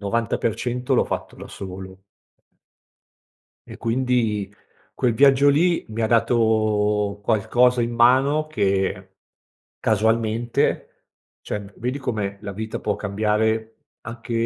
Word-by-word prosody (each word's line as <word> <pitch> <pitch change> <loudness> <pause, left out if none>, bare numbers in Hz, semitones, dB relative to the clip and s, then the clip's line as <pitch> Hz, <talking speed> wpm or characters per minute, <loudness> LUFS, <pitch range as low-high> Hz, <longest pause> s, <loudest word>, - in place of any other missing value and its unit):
90% 115 +3 -2
l'ho - - +3
fatto - - -5
da - - -9
solo. 95 0 -9 1.7
E - - -8
quindi 115 -4 0 0.4
quel 120 -2 +1
viaggio 140 +3 +5
lì 170 +4 +2
mi 110 +1 -4
ha 110 - +2
dato 110 -3 +1
qualcosa 120 +3 +2
in 120 +1 -2
mano 135 +6 +3
che 95 -7 -1 0.6
casualmente, 110 +2 0 0.4
cioè 105 -1 -6
vedi 125 +4 -3
come 105 -6 -3
la 100 -1 -6
vita 110 +1 -5
può 105 - -1
cambiare 110 +2 -1 0.3
anche 120 0 -7
110 Hz, 110 wpm, -22 LUFS, 105-120 Hz, 1.7 s, viaggio